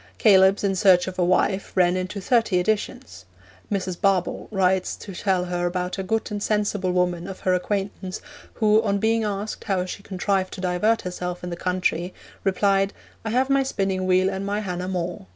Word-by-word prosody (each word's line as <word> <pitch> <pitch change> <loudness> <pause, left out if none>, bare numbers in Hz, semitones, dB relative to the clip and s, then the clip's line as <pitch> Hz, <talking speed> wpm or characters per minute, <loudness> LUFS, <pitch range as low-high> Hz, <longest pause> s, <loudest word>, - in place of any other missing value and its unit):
Caelebs 195 -2 +5
in 195 -1 +1
Search 185 -2 +5
of 185 0 -6
a - - +3
Wife 185 +2 +1
ran 180 -1 +4
into 185 +2 -3
thirty 225 -2 +2
editions. 215 - -3 0.5
Mrs. 190 -3 -1
Barbauld 195 -3 +1
writes 190 -2 +1
to 195 - -10
tell 185 0 0
her 175 0 -1
about 180 +1 -3
'a - - 0
good 220 +4 -2
and 205 -1 -3
sensible 205 -3 0
woman' 180 -1 0
of 190 -1 -8
her 185 - +2
acquaintance, 190 0 -2 0.4
who, 215 -1 +4
on 200 -3 0
being 225 +2 +1
asked 205 0 -4
how 190 -3 0
she 185 - -7
contrived 190 -1 -1
to - - -8
divert 200 +5 +1
herself 180 -1 -5
in 180 - -5
the - - -3
country, 180 0 -1 0.3
replied, 195 0 +2 0.3
'I 220 - -3
have 255 +4 +1
my 275 0 +4
spinning 195 -7 -1
wheel 185 0 +3
and 190 0 -2
my 205 +1 -1
Hannah 180 -2 -4
More. 180 - -4
190 Hz, 190 wpm, -24 LUFS, 180-205 Hz, 0.5 s, Caelebs